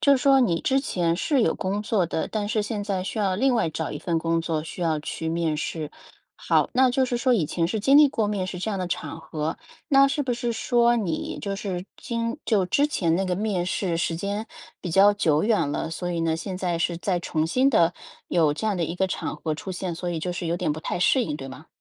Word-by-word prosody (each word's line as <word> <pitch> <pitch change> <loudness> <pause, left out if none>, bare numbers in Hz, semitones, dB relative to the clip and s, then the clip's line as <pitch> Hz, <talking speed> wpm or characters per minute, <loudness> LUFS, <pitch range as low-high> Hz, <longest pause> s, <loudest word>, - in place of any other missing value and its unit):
就 280 - +5
是 - - -4
说 275 -1 +6
你 185 -11 +2
之 270 0 +2
前 170 -10 0
是 270 - +2
有 160 - +1
工 200 +2 -2
作 210 -5 +1
的， 160 - -2
但 210 -2 -2
是 215 -1 +1
现 210 -1 -3
在 195 -3 -1
需 200 +4 -4
要 195 -3 +1
另 260 +7 +2
外 220 - +1
找 160 0 -3
一 150 - -5
份 170 -2 -1
工 165 0 +1
作， 160 -2 -2
需 165 - -8
要 160 -3 +1
去 160 +1 -4
面 165 -1 0
试。 155 0 -4 0.5
好， - - +1
那 260 0 +4
就 260 +1 +2
是 245 -1 -1
说 250 +1 +2
以 180 -9 +1
前 165 +2 0
是 210 +4 -2
经 275 +6 +5
历 300 0 +9
过 220 -5 -1
面 200 -3 -1
试 180 -1 -6
这 220 - -2
样 200 - -2
的 185 - -2
场 165 -1 -4
合， 155 0 -4 0.3
那 275 -2 +6
是 285 +1 0
不 255 -2 -1
是 240 0 -2
说 240 +1 +3
你 185 -9 -2
就 200 -1 -3
是 185 -3 -4
今 230 +2 -3
就 205 -5 +2
之 280 +11 +2
前 170 - +1
那 195 - 0
个 185 -1 0
面 195 -3 -1
试 180 -2 -1
时 165 0 -1
间 200 +5 -3 0.3
比 180 - -5
较 195 +4 +6
久 160 -7 +2
远 205 -9 +2
了， 160 - -2
所 175 +2 -4
以 170 - -1
呢， 160 -1 +1
现 185 +3 -5
在 180 -2 -1
是 170 0 0
在 175 +1 -1
重 160 -2 -1
新 255 +11 +2
的 170 -9 +4 0.4
有 155 -4 +3
这 220 +7 -2
样 205 - 0
的 170 - 0
一 165 - -4
个 190 +1 0
场 - - -3
合 160 - -3
出 190 +4 -6
现， 180 -2 -4
所 180 +1 -4
以 170 -2 -2
就 180 - -2
是 175 0 -4
有 170 +1 0
点 150 - 0
不 155 - -6
太 160 - -3
适 250 +6 +4
应， 150 - -3
对 135 -2 -8
吗？ 140 +4 -11
185 Hz, 280 characters per minute, -25 LUFS, 165-220 Hz, 0.5 s, 历